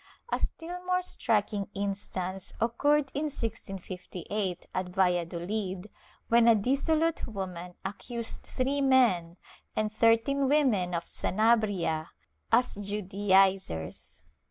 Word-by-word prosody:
^ - - +5
A - - -4
still 350 +2 -4
more 365 0 +1
striking 210 - 0
instance 195 -2 -3
occurred 280 +5 +2
in 290 +2 -1
1658, 195 - -4
at 185 -1 -2
Valladolid, 180 +2 -1 0.4
when 235 0 +5
a 230 - +8
dissolute 305 +9 +1
woman 180 -4 -6
accused 230 +4 -4
three 275 +2 -1
men 230 -11 +3 0.4
and 215 0 -1
thirteen 230 +5 +3
women 220 -12 +2
of 170 - -2
Sanabria 205 -7 +1 0.4
as 245 +2 +4
Judaizers. 195 - 0
205 Hz, 105 wpm, -29 LUFS, 185-245 Hz, 0.4 s, a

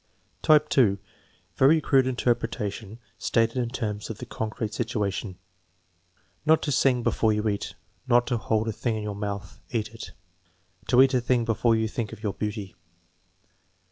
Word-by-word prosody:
Type 155 -1 +5
(2), 105 -7 +4 0.6
very 150 +5 +5
crude 135 -3 +3
interpretation 115 -4 -2 0.2
stated 115 +1 +1
in 120 -2 0
terms 105 -4 -4
of 110 - -5
the - - -7
con 110 - -4
crete 110 -1 -4
situation: 105 -4 -2 1.1
"Not 155 +1 +4
to 145 - -1
sing 125 -2 +2
before 110 -1 +2
you 105 +1 -1
eat." 100 -1 -2 0.3
"Not 120 -1 +4
to 120 - 0
hold 110 +1 0
a 110 - -1
tiling 115 +1 -2
in 105 - -4
your 105 -1 -4
month; 100 -2 -5
cat 110 -3 -2
it." 115 - -9 0.7
"To 125 +1 +6
eat 135 0 +2
a 125 - +3
tiling 120 -1 +1
before 115 0 +2
you 110 0 +1
think 110 -1 -4
of 105 - -11
your 105 -2 -1
beauty." 105 -2 -5
115 Hz, 170 wpm, -26 LUFS, 105-125 Hz, 1.1 s, To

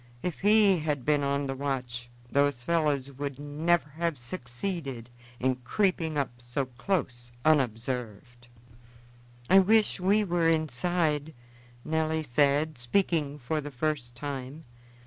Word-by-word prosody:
If 180 -3 -3
he 205 -2 +5
had 150 -4 -2
been 150 -1 +3
on 140 0 0
the 135 - -2
watch, 125 -3 -3 0.2
those 140 -3 +2
fellows 145 -3 +1
would 140 0 -5
never 150 +3 +1
have 165 0 -2
succeeded 125 - -5 0.3
in 130 0 +1
creeping 160 - 0
up 120 -4 -2
so 120 +3 -2
close 125 -3 -3
unobserved." 120 -4 -1 1.0
"I 190 - +7
wish 215 +2 +3
we 200 +4 +3
were 175 -3 +2
inside," 155 0 0 0.5
Nelly 160 0 0
said, 145 +2 +2
speaking 150 +2 0
for 150 +3 -2
the 145 - -6
first 130 -3 -2
time. 140 +2 -6
145 Hz, 125 wpm, -28 LUFS, 125-165 Hz, 1.0 s, I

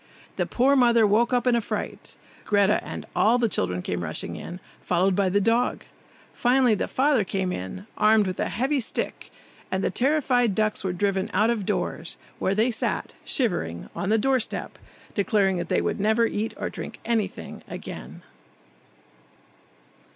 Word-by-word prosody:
The - - -1
poor 265 +3 +3
mother 235 -4 +5
woke 220 +4 +3
up 245 -1 +1
in 250 -1 +4
a 235 - +2
fright; - - -5 0.3
Greta 205 0 +2
and - - -7
all 225 +4 +4
the 240 -2 +2
children 90 - -1
came 90 -1 -2
rushing 80 -1 -3
in, 175 +1 -7 0.2
followed 185 +2 +1
by 195 -1 +2
the 200 +2 +2
dog; 230 +4 +1 0.5
finally 250 -1 +3
the 205 - -1
father 270 -4 +2
came, 185 - -3
armed 215 -1 +5
with 185 -1 -4
a - - 0
heavy 270 +5 0
stick, 230 - -3 0.4
and 190 0 -1
the - - +1
terrified 250 -5 +2
ducks 215 -2 0
were 190 - 0
driven 195 +1 0
out 215 +4 +4
of 215 -5 -2
doors, - - -2 0.2
where 195 - +1
they 225 +4 +2
sat, 220 - -2
shivering, 85 - -1
on 195 - -2
the 220 - +4
doorstep, 260 +1 -1 0.3
declaring 200 -3 +2
that 175 -1 -4
they - - +2
would - - -2
never 220 +3 +3
eat 220 0 -2
or - - -3
drink - - -7
anything 225 -3 -2
again. - - -8
215 Hz, 165 wpm, -25 LUFS, 190-240 Hz, 0.5 s, mother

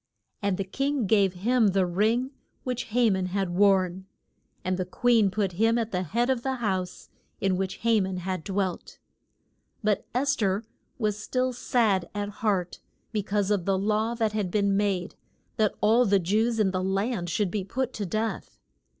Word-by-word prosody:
And 200 -2 0
the 195 - -1
king 275 +5 -1
gave 195 -2 +3
him 225 +5 +2
the 190 -1 +2
ring 220 +9 +1 0.3
which 250 0 -3
Ha 235 0 +3
man 190 -1 0
had 190 -1 -1
worn, 190 -1 +2 0.6
and 185 0 +1
the 185 - 0
queen 225 +3 +3
put 195 0 -1
him 225 +6 +2
at 230 -1 -2
the 180 - 0
head 230 +8 0
of 255 -3 0
the 265 +1 -1
house 190 -7 -3 0.3
in 195 -1 +1
which 190 0 -3
Ha 230 -1 +4
man 190 -1 -2
had 185 -1 -3
dwelt. 190 -1 -3 0.9
But 210 -1 0
Es 275 +2 +2
ther 200 -1 0 0.3
was 210 -3 -1
still 255 +2 -1
sad 220 -7 +1
at 205 0 -2
heart 195 -5 0 0.3
be 215 -2 0
cause 205 0 -1
of 195 -4 +1
the 195 -1 +2
law 215 +4 0
that 225 -2 0
had 210 -4 -1
been 200 +1 +1
made, 195 -3 0 0.4
that 215 -2 +2
all 230 +4 +4
the 200 -2 +4
Jews 220 +6 +1
in 200 -3 +3
the 185 0 -1
land 195 -1 -1
should 185 +2 0
be 205 -1 -2
put 255 +6 -3
to 205 - -3
death. 215 +2 -3
205 Hz, 185 wpm, -27 LUFS, 190-225 Hz, 0.9 s, Ha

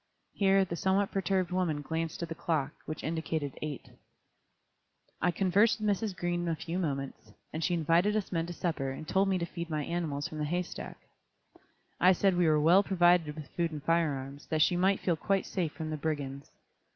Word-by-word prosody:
Here 195 -1 +3
the 170 - -4
somewhat 190 +3 +1
perturbed 190 -2 0
woman 170 -5 0
glanced 160 +2 -3
at 170 - -5
the - - -3
clock, 155 -4 -1 0.2
which 155 - -5
indicated 160 -3 -2
8:00. 150 -4 -6 1.3
I 180 - +3
conversed 195 +6 +3
with 215 - -1
Mrs. 200 -2 -4
Green 175 0 -1
a 165 - 0
few 165 +3 -4
moments, 140 -6 -4 0.2
and 160 - -3
she 175 - +1
invited 170 +6 +2
us 215 -3 -1
men 165 -2 -1
to 175 - -5
supper 160 -6 -2
and 135 +4 -7
told 195 +3 +2
me 190 - +2
to 170 - -1
feed 170 0 -6
my 155 -2 -1
animals 155 -5 -2
from 155 - -7
the 150 - 0
hay 175 +4 0
stack. - - -8 1.0
I 185 +1 +6
said 190 +1 +2
we 175 -1 +3
were 155 -1 +4
well 170 +6 +6
provided 175 -5 +3
with 155 -3 -8
food 170 -1 0
and 150 -2 -6
fire 165 -2 +2
arms, 135 +2 -8
that 155 -1 +3
she 175 - +2
might 190 +2 +2
feel 175 - +1
quite 195 +4 0
safe 170 -5 -2
from 160 -2 -5
the 155 - -2
brigands. 140 -3 -3
170 Hz, 205 wpm, -30 LUFS, 155-185 Hz, 1.3 s, I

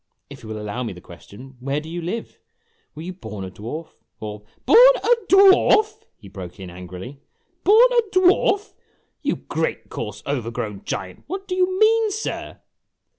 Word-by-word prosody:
If - - -11
you 110 - -11
will 110 0 -5
allow 105 +4 -4
me 115 -5 -4
the 90 - -12
question, 120 +10 -14
where 140 +3 -2
do 155 - -10
you 170 +2 -5
live? 185 +8 -5 0.6
Were 155 - -8
you 185 +2 -6
born 110 - -8
a 95 - -8
dwarf, 135 - -7 0.3
or 105 -1 -7
" - - -38
"Born - - +8
a 485 - +5
dwarf!" 415 +3 +5
he 105 - -14
broke 95 -1 -9
in 95 -2 -8
angrily, 90 +9 -9 0.4
"born 440 +5 +7
a 485 -1 +4
dwarf! 380 +3 +3 0.5
You - - 0
great, - - -3
coarse, - - -6
overgrown - - -4
giant - - -5
what 390 +1 -6
do 365 - -3
you 370 0 +1
mean, 445 0 +4
sir?' 435 +2 -5
165 Hz, 175 wpm, -22 LUFS, -, 0.6 s, Born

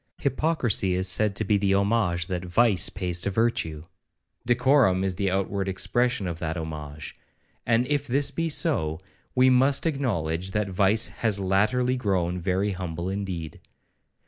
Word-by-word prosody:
Hypocrisy 130 - 0
is 95 +1 -1
said 105 +2 +3
to 110 - -1
be 105 0 +2
the 95 -1 +2
homage 100 -4 +1
that 90 -1 -4
vice 95 -1 +2
pays 90 -2 -2
to 100 - -1
virtue,—decorum 95 - 0
is 95 -1 -1
the 95 +2 -1
outward 95 +1 -1
expression 120 +4 0
of 85 -2 -4
that 80 0 -3
homage; 75 -2 -7 0.5
and 120 +1 +2
if 145 0 -1
this 140 +3 +1
be 165 0 -2
so, 80 - 0 0.4
we 130 0 +5
must 135 +4 +3
acknowledge 95 - -1
that 105 -2 -1
vice 100 +4 +2
has 110 -4 0
latterly 110 +7 +1
grown 90 -6 -1
very 95 +3 0
humble 90 -1 -4
indeed. 95 -5 -5
95 Hz, 145 wpm, -25 LUFS, 90-120 Hz, 0.5 s, we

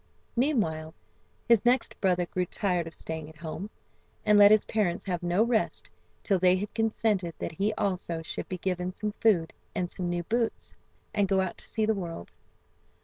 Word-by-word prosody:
Meanwhile 205 - 0 0.5
his 235 -3 +5
next 245 +2 +1
brother 180 -2 +2
grew 180 +1 -2
tired 180 -5 -1
of 165 - -8
staying 160 -1 -5
at 160 - -15
home, 165 +5 -6 0.6
and 210 - +5
let 205 0 +9
his 215 0 +5
parents 195 -5 0
have 180 -3 -2
no 175 +4 +2
rest 230 -2 0 0.3
till 195 -3 +2
they 180 0 +5
had 200 +2 -4
consented 215 -5 0
that - - -4
he 200 +7 0
also 180 -5 -2
should - - -5
be 185 - -3
given 180 0 -2
some 210 +2 -3
food 180 -8 +3 0.2
and 175 -1 -1
some 180 -2 -2
new 175 0 -1
boots, 230 +5 -1 0.4
and 205 -2 +2
go 190 0 +2
out 190 -2 -2
to - - -6
see 220 -1 +1
the 220 - +2
world. 170 - -6
185 Hz, 185 wpm, -28 LUFS, 175-215 Hz, 0.6 s, let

